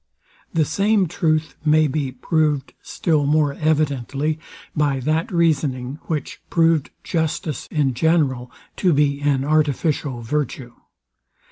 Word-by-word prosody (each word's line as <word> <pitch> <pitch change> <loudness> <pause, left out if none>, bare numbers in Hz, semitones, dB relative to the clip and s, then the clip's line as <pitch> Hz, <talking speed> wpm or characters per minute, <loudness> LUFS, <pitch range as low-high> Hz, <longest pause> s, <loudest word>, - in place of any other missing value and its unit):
The 160 -2 +2
same 200 +5 +2
truth 160 -2 0
may 155 0 +4
be 140 -1 -2
proved 150 +1 0
still 150 -4 0
more 150 -1 +2
evidently 150 0 0 0.4
by 145 -3 +1
that 155 +5 0
reasoning, 145 -5 0
which 155 -4 -4
proved 165 -3 +2
justice 160 -2 -2
in 145 -4 +1
general 130 -3 +1 0.3
to 180 -4 +3
be 140 -1 +2
an 140 -2 +1
artificial 150 -3 0
virtue. 130 -1 -3
150 Hz, 115 wpm, -21 LUFS, 140-160 Hz, 0.4 s, may